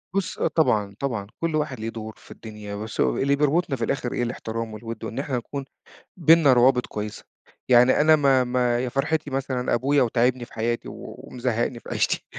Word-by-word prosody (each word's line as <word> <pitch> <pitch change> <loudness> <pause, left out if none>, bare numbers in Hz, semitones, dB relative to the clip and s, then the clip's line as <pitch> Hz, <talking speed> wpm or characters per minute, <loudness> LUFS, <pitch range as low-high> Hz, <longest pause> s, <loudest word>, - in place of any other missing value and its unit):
بُص 195 -3 -1
آه - - +2
طبعًا، 105 -11 +1
طبعًا. 115 -8 -3 0.2
كل 165 -2 0
واحد 150 -5 -2
ليه 110 +1 -3
دور 110 -1 -7
في - - -17
الدنيا 105 -2 -8
بس 110 +2 -7
أهو - - +2
اللي 140 +1 +2
بيربُطنا 150 +1 +1
في 120 - -4
الآخر 125 0 -2
إيه، - - -1
الإحترام 115 -2 -4
والوِد 115 +1 -7
وإن 120 - -4
إحنا 135 -2 -2
نكون 135 +3 -5 0.5
بيننا 160 -4 +6
روابط 125 0 +4
كويسة. 105 0 -6 0.5
يعني 125 +3 +6
أنا 155 +1 +6
ما 135 -3 +3
ما 125 -1 +1
يا 125 0 -2
فرحتي 145 +3 -1
مثلًا 130 -2 -2
أبويا 140 +4 +2
وتاعبني 120 +1 +1
في - - -20
حياتي، 115 +1 -2
و - - -9
ومزهّقني 120 -1 -2
في - - -12
عيشتي. - - 0
125 Hz, 195 wpm, -24 LUFS, 115-140 Hz, 0.5 s, بيننا